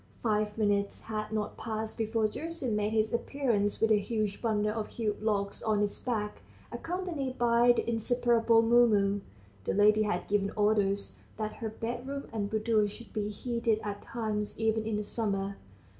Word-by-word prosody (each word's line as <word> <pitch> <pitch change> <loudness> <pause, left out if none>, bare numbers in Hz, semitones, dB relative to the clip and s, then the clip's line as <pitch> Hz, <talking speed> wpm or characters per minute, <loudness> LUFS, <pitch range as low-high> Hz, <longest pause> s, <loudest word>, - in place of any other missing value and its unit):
Five 210 -2 0
minutes 205 -2 +1
had 215 -1 -4
not 215 -1 -2
passed 220 0 -4
before 220 -1 +1
Gerasim 300 -1 -3
made 210 0 +1
his 220 0 +1
appearance 235 -5 0
with 225 0 +3
a 210 - +6
huge 210 -1 -2
bundle 210 -2 +1
of 215 -1 -3
hewn 215 -3 -2
logs 200 -2 -1
on 215 -1 +1
his 205 -1 -1
back, 215 -4 -3 0.3
accompanied 330 -7 -3
by 240 0 +5
the 240 - -2
inseparable 235 0 +3
Mumu. 215 -4 +4 0.4
(The - - 0
lady 210 +1 +5
had 205 -4 -1
given 200 -1 +1
orders 205 -1 +1 0.2
that 215 -1 -3
her 225 - -3
bedroom 245 +5 -4
and 205 -2 -1
boudoir 220 -1 +2
should 230 +3 -11
be 210 -1 -1
heated 230 0 0
at 205 -1 -4
times 215 -3 -3
even 220 0 +1
in 215 -2 0
the 210 - -2
summer.) 200 -2 -2
220 Hz, 165 wpm, -30 LUFS, 210-235 Hz, 0.4 s, a